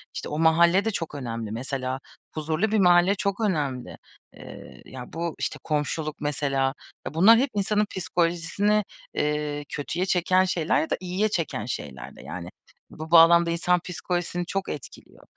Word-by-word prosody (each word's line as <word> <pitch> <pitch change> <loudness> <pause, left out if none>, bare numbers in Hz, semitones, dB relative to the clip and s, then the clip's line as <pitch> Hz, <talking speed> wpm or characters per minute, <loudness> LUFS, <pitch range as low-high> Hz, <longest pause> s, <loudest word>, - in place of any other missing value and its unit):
işte, - - -5
o 150 - -3
mahalle 170 +5 +4
de 225 - +1
çok 165 -5 -4
önemli. 115 -5 -5
Mesela, 130 +2 -3 0.3
huzurlu 160 +7 -1
bir 220 - +2
mahalle 180 +1 +5
çok 200 +2 -2
önemli. 145 - -2 0.4
Eee, 65 -1 -12
ya, 125 -2 -10
bu, 170 0 -3
işte, - - -3
komşuluk, 150 0 -2
mesela, 140 -2 0 0.3
eee, - - -5
bunlar 200 +8 +7
hep 270 +2 +1
insanın 210 +1 +1
psikolojisini, 175 +4 0 0.3
eee, 150 0 -1
kötüye 170 +5 -3
çeken 185 0 +3
şeyler 170 -3 +1
ya 160 - -3
da - - 0
iyiye 185 +4 -1
çeken 160 - -2
şeyler 65 - -6
de, - - -13
yani. - - -7 0.4
Bu 160 +1 -9
bağlamda 170 0 +7
insan 175 +1 +2
psikolojisini 175 0 -3
çok 195 +2 -3
etkiliyor. 145 - -9
165 Hz, 155 wpm, -25 LUFS, 145-185 Hz, 0.4 s, bunlar